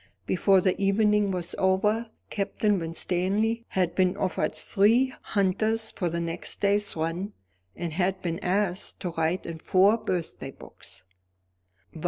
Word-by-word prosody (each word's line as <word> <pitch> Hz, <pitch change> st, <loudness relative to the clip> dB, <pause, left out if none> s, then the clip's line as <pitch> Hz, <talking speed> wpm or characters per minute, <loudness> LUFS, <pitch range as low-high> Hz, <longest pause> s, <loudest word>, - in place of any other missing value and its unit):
Before 190 Hz, +1 st, +3 dB
the 185 Hz, 0 st, +2 dB
evening 210 Hz, +1 st, +3 dB
was 180 Hz, -2 st, -2 dB
over, 210 Hz, +5 st, +2 dB, 0.2 s
Captain 205 Hz, 0 st, 0 dB
Winstanley 190 Hz, +7 st, -1 dB
had 180 Hz, -3 st, 0 dB
been 185 Hz, +1 st, +2 dB
offered 190 Hz, -3 st, -1 dB
three 235 Hz, +6 st, +3 dB
hunters 215 Hz, +3 st, 0 dB
for 180 Hz, -4 st, -2 dB
the 170 Hz, +1 st, -2 dB
next 170 Hz, 0 st, -4 dB
day's 205 Hz, 0 st, +1 dB
run, 170 Hz, +6 st, -3 dB, 0.4 s
and 170 Hz, -2 st, -4 dB
had 185 Hz, +2 st, 0 dB
been 170 Hz, -1 st, -2 dB
asked 185 Hz, 0 st, -1 dB
to 180 Hz, -, -2 dB
write 165 Hz, +2 st, -1 dB
in 165 Hz, -1 st, -6 dB
four 195 Hz, +6 st, +4 dB
birthday 180 Hz, -6 st, -4 dB
books. -, -, -13 dB
190 Hz, 135 wpm, -27 LUFS, 175-210 Hz, 0.4 s, four